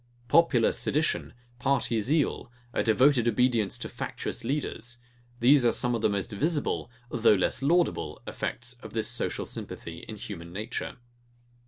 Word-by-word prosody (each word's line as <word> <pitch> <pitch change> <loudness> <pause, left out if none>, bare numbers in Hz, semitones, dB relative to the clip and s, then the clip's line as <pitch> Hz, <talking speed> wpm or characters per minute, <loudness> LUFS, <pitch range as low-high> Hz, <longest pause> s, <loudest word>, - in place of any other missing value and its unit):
Popular 135 -7 +5
sedition, 150 +6 0 0.3
party 125 -3 +1
zeal, 135 +1 +1 0.2
a - - +1
devoted 120 +2 +4
obedience 120 -3 +2
to - - -5
factious - - -5
leaders; 120 -2 -3 0.4
these 135 +2 +6
are 120 - +5
some 120 -1 +1
of 115 - -1
the - - +3
most 100 +3 -2
visible, 145 +7 -1 0.2
though 115 -3 +5
less 95 - 0
laudable 170 +5 +1
effects 120 +2 -3
of - - -10
this 110 -1 0
social 120 0 -2
sympathy 85 0 -7
in 110 - -5
human 85 -5 -8
nature. 105 +6 -4
120 Hz, 145 wpm, -28 LUFS, 110-140 Hz, 0.4 s, these